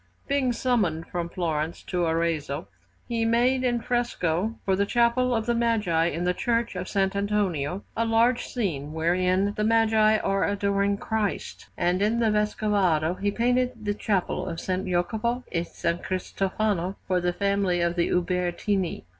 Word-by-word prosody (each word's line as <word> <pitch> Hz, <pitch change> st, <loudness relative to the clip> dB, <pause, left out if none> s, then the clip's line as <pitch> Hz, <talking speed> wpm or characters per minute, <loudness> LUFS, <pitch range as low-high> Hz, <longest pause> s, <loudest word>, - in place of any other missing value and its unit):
Being 275 Hz, -3 st, +1 dB
summoned 220 Hz, -10 st, 0 dB
from 170 Hz, -1 st, -4 dB
Florence 165 Hz, -3 st, -2 dB
to 180 Hz, -1 st, -1 dB
Arezzo, 160 Hz, -3 st, -1 dB, 0.4 s
he 230 Hz, -1 st, -1 dB
made 245 Hz, +3 st, +2 dB
in 240 Hz, -2 st, +1 dB
fresco, 225 Hz, -5 st, -1 dB
for 190 Hz, -, +2 dB
the 200 Hz, -, +2 dB
Chapel 240 Hz, +2 st, +2 dB
of 225 Hz, -1 st, -1 dB
the 240 Hz, -, +1 dB
Magi 215 Hz, -9 st, +1 dB
in 170 Hz, 0 st, -2 dB
the 180 Hz, 0 st, +2 dB
Church 235 Hz, +1 st, -1 dB
of 180 Hz, 0 st, -4 dB
S. -, -, -9 dB
Antonio, 195 Hz, -4 st, 0 dB
a 230 Hz, -, +1 dB
large 230 Hz, +2 st, +2 dB
scene 155 Hz, -, -3 dB
wherein 185 Hz, +4 st, +1 dB
the 210 Hz, -, -1 dB
Magi 220 Hz, -1 st, +4 dB
are 195 Hz, -1 st, 0 dB
adoring 200 Hz, 0 st, +1 dB
Christ; 215 Hz, -1 st, -3 dB
and 180 Hz, +2 st, +1 dB
in 220 Hz, +3 st, +2 dB
the 225 Hz, -2 st, +3 dB
Vescovado 205 Hz, -6 st, +1 dB
he 205 Hz, -, +2 dB
painted 245 Hz, +1 st, 0 dB
the 205 Hz, -, +1 dB
Chapel 200 Hz, -3 st, -1 dB
of -, -, -3 dB
S. 165 Hz, -, -7 dB, 0.2 s
Jacopo 220 Hz, +7 st, -1 dB
e 170 Hz, -, 0 dB
S. 170 Hz, -, -8 dB, 0.2 s
Cristofano 190 Hz, 0 st, -1 dB
for 185 Hz, -1 st, +1 dB
the 175 Hz, 0 st, +1 dB
family 200 Hz, -1 st, 0 dB
of 170 Hz, 0 st, +1 dB
the 170 Hz, -1 st, +1 dB
Ubertini. 180 Hz, +1 st, -1 dB
200 Hz, 160 wpm, -26 LUFS, 175-225 Hz, 0.4 s, Magi